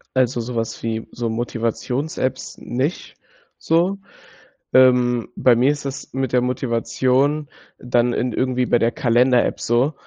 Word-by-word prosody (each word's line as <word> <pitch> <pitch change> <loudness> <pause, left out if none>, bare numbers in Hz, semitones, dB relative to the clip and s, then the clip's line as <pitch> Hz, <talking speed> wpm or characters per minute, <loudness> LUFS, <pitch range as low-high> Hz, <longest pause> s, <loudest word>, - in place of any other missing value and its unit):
Also, 125 -2 +1
sowas 115 -1 -4
wie, 110 -1 -3
so 120 -1 -3
Motivations-Apps 120 +4 -3
nicht 130 +7 -3 0.4
so. 175 +5 +1 0.8
Ähm, 125 -2 +4
bei 125 -2 +4
mir 125 +4 +3
ist 145 -1 -5
das 135 0 -6
mit 135 -2 -2
der 125 - +4
Motivation 130 +4 0 0.3
dann 120 -1 +1
in 125 0 -1
irgendwie 125 0 0
bei 120 - +3
der 115 - +2
Kalender-App 125 +1 +2
so. 120 +6 +1
125 Hz, 130 wpm, -21 LUFS, 120-130 Hz, 0.8 s, Ähm